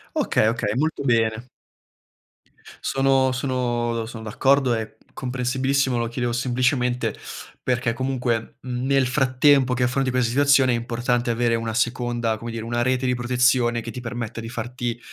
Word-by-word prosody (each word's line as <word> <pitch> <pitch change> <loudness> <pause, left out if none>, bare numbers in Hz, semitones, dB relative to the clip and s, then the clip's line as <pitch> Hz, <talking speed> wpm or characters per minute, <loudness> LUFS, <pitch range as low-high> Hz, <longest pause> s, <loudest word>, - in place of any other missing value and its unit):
Okay, 110 - +2
okay. 110 -2 0
Molto 155 +4 -1
bene. 115 -2 +1 1.4
Sono 135 -1 +2
sono 125 -2 -1
do 115 -1 -2
sono 115 -1 -8
d'accordo 130 +4 +2
è 110 -1 -4 0.2
comprensibilissimo, 130 +1 0
lo 115 - -1
chiedevo 120 +1 -2
semplicemente, 125 -2 0 0.5
perché 120 -2 0
comunque, 125 -3 -2
mhmm, 125 0 -4
nel 135 -1 +3
frattempo 130 0 +3
che 125 - 0
affronti 130 +2 +1
questa 125 -2 +1
situazione 140 0 +4
è - - +2
importante 120 +1 -1
avere 120 0 +1
una 115 -1 -2
seconda, 120 -2 0
come 115 +2 -7
dire, 115 -1 -5
una 120 +1 -1
rete 130 +1 +1
di 125 - +2
protezione 120 -1 +2
che 115 - -7
ti 125 - -7
permetta 120 -1 -5
di 115 - -7
farti, 120 0 -4
125 Hz, 155 wpm, -23 LUFS, 115-130 Hz, 1.4 s, situazione